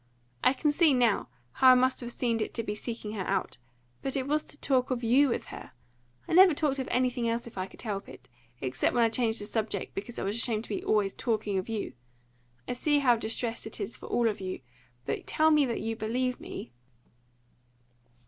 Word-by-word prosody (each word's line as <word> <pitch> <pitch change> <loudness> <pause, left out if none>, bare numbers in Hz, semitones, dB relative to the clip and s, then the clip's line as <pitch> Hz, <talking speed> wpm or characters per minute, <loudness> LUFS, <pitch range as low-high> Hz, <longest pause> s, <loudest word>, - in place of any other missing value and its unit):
I - - +5
can 295 +2 +1
see, 300 -2 +4
now, 240 -4 +2 0.2
how 260 - +5
I 255 - +9
must 255 +1 +2
have 240 0 -5
seemed 230 -3 0
to 230 - -3
be 210 - -3
seeking 220 0 -6
her 200 -4 -4
out; - - -1 0.4
but 270 - -3
it 265 -1 -1
was 300 +1 +1
to - - -7
talk 260 -3 +1
of 250 -2 -2
you 260 +5 +5
with - - -2
her - - -10 0.5
I - - -3
never 365 -2 +8
talked 280 -3 0
of 260 - -3
anything 250 -2 +1
else 230 +1 -1
if 235 - -11
I 185 0 -3
could - - -11
help 205 -4 -4
it, - - -13 0.3
except 130 - 0
when 240 - +4
I 230 - +4
changed 225 -1 +1
the 205 - -5
subject 210 -2 -2
because 225 +5 -5
I - - -3
was 200 +2 -1
ashamed 225 -2 -1
to - - -11
be 205 - -3
always 205 -2 +2
talking 215 -4 -1
of 190 - -6
you. 220 -2 -3 0.7
I - - -1
see 295 +4 +2
how 255 -4 +4
distressing 225 0 -3
it - - -8
is 205 +2 -4
for - - -10
all 240 -1 +2
of 210 -3 -2
you. 185 -5 -4 0.4
But - - -3
tell 315 +1 +3
me 300 -3 +4
that 235 - -2
you 225 +1 -2
believe 250 +4 -1
me!" 120 - -8
235 Hz, 220 wpm, -29 LUFS, 215-255 Hz, 0.7 s, I